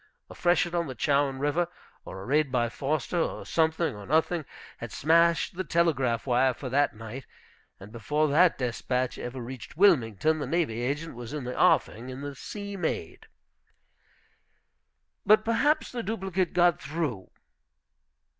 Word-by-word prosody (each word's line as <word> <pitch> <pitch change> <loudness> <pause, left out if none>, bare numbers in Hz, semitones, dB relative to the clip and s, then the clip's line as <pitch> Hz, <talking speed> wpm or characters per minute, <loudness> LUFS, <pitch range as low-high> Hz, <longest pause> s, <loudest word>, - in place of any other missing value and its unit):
A - - -8
freshet 175 -1 +1
on 170 -2 0
the 130 - -6
Chowan 140 -1 +1
River, 145 +5 0 0.4
or 95 0 -8
a - - -9
raid 145 +1 +1
by 120 -2 +1
Foster, 145 +6 -2
or - - -2
something, 160 -3 +1
or 105 -1 -10
nothing, 160 +2 +1 0.3
had 120 -2 -7
smashed 170 +3 +3
the 185 - -2
telegraph 140 -9 +1
wire 125 0 +2
for 130 - -6
that 140 -1 +2
night. 115 +4 -8 0.5
And 100 +2 -12
before 150 +7 0
that 170 +4 +4
despatch 125 0 -2
ever 125 +2 -6
reached 125 +4 -8
Wilmington 155 - +3
the 145 - -3
navy 140 -7 0
agent 145 +6 -3
was 120 +2 -8
in 150 -3 -4
the 125 0 -5
offing 115 +4 +2
in 130 +1 -7
the 145 0 -5
Sea 200 +8 -7
Maid. 160 - -4 2.0
"But 215 +1 +5
perhaps 290 +7 +1
the 245 - -3
duplicate 190 -5 -2
got 175 -3 +3
through?" 140 - -3
145 Hz, 155 wpm, -27 LUFS, 125-170 Hz, 2.0 s, But